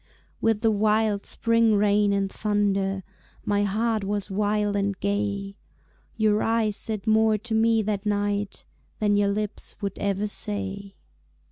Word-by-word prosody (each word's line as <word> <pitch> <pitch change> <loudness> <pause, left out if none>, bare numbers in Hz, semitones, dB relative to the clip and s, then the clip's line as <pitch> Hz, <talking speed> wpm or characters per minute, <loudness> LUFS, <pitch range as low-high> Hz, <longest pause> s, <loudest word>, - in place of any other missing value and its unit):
With 225 -2 +2
the 225 -2 +3
wild 215 0 +1
spring 230 -1 +2
rain 205 0 +3
and 200 -1 +1
thunder 195 -2 0 0.4
My 205 0 +1
heart 220 +1 0
was 200 0 -2
wild 205 +1 0
and 200 -1 -1
gay; 200 0 -2 0.6
Your 215 -1 +2
eyes 225 -2 +1
said 215 -2 -4
more 220 0 +3
to 225 +2 -6
me 225 0 +3
that 205 -1 -2
night 205 -1 -1 0.3
Than 205 -1 +2
your 205 0 +2
lips 210 +1 -3
would 200 - -3
ever 200 0 0
say. 200 -1 -4
205 Hz, 140 wpm, -25 LUFS, 200-215 Hz, 0.6 s, the